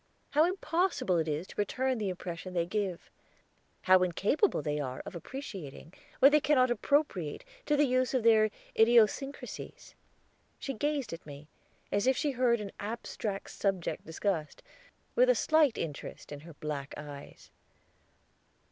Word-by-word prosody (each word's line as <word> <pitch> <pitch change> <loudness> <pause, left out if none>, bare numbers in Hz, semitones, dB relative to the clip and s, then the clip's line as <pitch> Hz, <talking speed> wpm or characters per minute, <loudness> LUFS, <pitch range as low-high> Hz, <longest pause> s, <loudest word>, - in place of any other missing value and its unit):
How 305 +2 +5
impossible 350 - 0
it 160 - -1
is 155 +3 -2
to - - -13
return 255 +4 0
the 205 -3 -1
impression 180 0 -6
they 170 -1 +2
give. 190 -2 -3 0.7
How 185 0 +6
incapable 200 - +1
they 150 -1 -1
are 130 -3 -4
of - - -7
appreciating 185 - -8 0.2
what 275 - +7
they 300 - +6
cannot 255 -4 +3
appropriate 240 - 0 0.2
to 295 - +3
the 295 - +5
use 255 0 +1
of 250 - +1
their 220 -1 +5 0.3
idiosyncrasies." 235 +4 +1 0.6
She 275 - -4
gazed 285 - -1
at 165 - -8
me, 145 +1 -10 0.4
as 205 +4 +1
if 260 - +3
she 295 - +1
heard 245 -2 +2
an 205 -2 -6
abstract 210 -2 -4
subject 190 -4 -2
discussed, 160 -2 -3 0.5
with - - +4
a - - +6
slight 310 -6 +3
interest 150 -2 -6
in 145 - -6
her 165 +3 -12
black 145 -2 -5
eyes. 145 -2 -10
210 Hz, 145 wpm, -31 LUFS, 170-265 Hz, 0.7 s, what